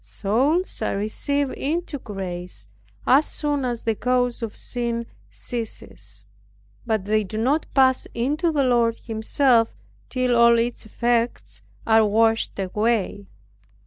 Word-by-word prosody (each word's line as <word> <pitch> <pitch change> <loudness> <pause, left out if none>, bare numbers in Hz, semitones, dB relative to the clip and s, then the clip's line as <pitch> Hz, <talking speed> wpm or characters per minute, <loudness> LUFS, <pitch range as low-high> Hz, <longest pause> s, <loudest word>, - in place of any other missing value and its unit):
Souls, 270 - 0
are 215 - -1
received 275 +7 -1
into 310 0 -3
grace, 180 - -6 0.4
as 280 +4 +5
soon 290 -2 -1
as 240 -2 -2
the 225 - +1
cause 245 +2 0
of 225 -2 -4
sin 235 -1 -2 0.2
ceases; 230 -3 -6 0.6
but 220 -4 0
they 215 +1 +2
do 205 +2 -6
not 270 +8 +1
pass 260 -1 +4
into 295 +8 0
the 290 -3 +1
Lord 235 -2 +2
Himself, 230 +1 +1 0.3
till 255 -1 +1
all 235 0 +6
its 235 -1 -2
effects 235 +1 -1 0.2
are 220 0 +5
washed 225 +2 +2
away. 205 +1 -1
235 Hz, 125 wpm, -23 LUFS, 220-260 Hz, 0.6 s, all